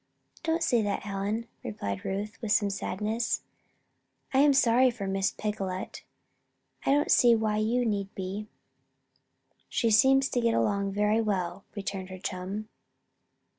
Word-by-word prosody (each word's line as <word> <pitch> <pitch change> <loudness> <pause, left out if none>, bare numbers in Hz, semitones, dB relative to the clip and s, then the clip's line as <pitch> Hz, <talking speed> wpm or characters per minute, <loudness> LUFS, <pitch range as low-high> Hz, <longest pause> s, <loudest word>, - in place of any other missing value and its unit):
"Don't 330 +1 0
say 240 -2 +3
that, 205 -1 -2
Helen," 205 +3 -3 0.2
replied 100 -2 -4
Ruth, 205 +3 -4
with 220 -3 -2
some 205 -1 +3
sadness. 210 +4 -2 0.9
"I 265 - +4
am 290 +1 +6
sorry 255 -1 +5
for 230 -5 -5
Miss 195 0 0
Picolet." 195 -3 -4 0.8
"I - - -1
don't 290 +1 +3
see 240 -1 +6
why 215 -1 0
you 235 +3 +1
need 200 -3 -2
be. 195 +3 -4 1.2
She 230 -2 +1
seems 265 +4 +5
to 245 - 0
get 230 -1 +2
along 200 -1 +1
very 210 +2 +2
well," 195 -3 -2
returned 195 -2 -4
her 185 - -7
chum. 190 +3 -5
210 Hz, 140 wpm, -28 LUFS, 195-230 Hz, 1.2 s, am